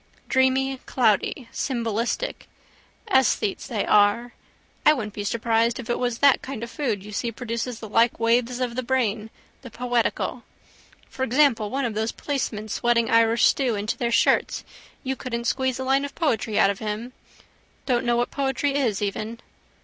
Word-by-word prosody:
Dreamy, 260 0 +2
cloudy, 230 +1 +1
symbolistic. 235 - -2 0.6
Esthetes 255 - +2
they 225 -6 -2
are. 210 +4 +3 0.5
I 305 - +7
wouldn't 215 -7 -4
be 205 - -5
surprised 230 +2 +1
if 240 -1 -4
it - - -1
was 245 -2 -1
that 280 0 +4
kind 260 -4 -6
of 235 - -6
food 225 -10 -2
you 210 - -9
see 230 +3 -2
produces 235 +1 -4
the 220 - -7
like 230 +3 +2
waves 240 +2 +1
of 245 -2 -2
the 255 - -1
brain 230 -4 -1 0.3
the 255 - -10
poetical. 245 0 -1 0.7
For - - -10
example 260 -4 +3
one 270 +2 -1
of 230 - -2
those 220 +2 -1
policemen 235 -7 -3
sweating 235 +1 +1
Irish 230 0 +4
stew 255 -5 +2
into 205 +2 -2
their 235 -1 -2
shirts - - +2 0.4
you 265 0 -2
couldn't 235 -3 -4
squeeze 260 0 0
a 260 - -4
line 270 +1 +2
of 285 - -6
poetry 225 -9 0
out 195 - +5
of 200 - -7
him. 220 +3 -4 0.7
Don't 245 -3 +1
know 240 0 +2
what 240 - 0
poetry 275 0 -1
is 235 -8 0
even. 215 +3 -3
235 Hz, 170 wpm, -24 LUFS, 220-260 Hz, 0.7 s, I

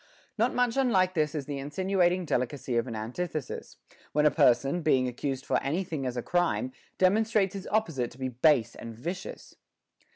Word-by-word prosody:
8. 240 - -24
Not 235 +3 +2
much 245 0 +1
unlike 190 -9 +3
this 155 -2 0
is 145 -3 -3
the 140 -1 -4
insinuating 180 +4 +1
delicacy 130 -2 -1
of 115 +1 +1
an 115 - -5
antithesis, 125 +6 -5 0.4
when 150 +1 +3
a 150 - +6
person, 135 +7 +3
being 130 -5 +3
accused 130 +2 -3
for - - +1
any 155 +8 -1
thing 155 -7 -4
as 125 0 -4
a 120 - -2
crime, 175 +9 0 0.3
demonstrates 205 +1 +3
its 195 -1 -6
opposite 165 - 0
to 120 - -16
be 130 -1 -2
base 125 -1 +3
and 115 -1 -8
vicious. 175 - -6
155 Hz, 185 wpm, -28 LUFS, 130-185 Hz, 0.4 s, a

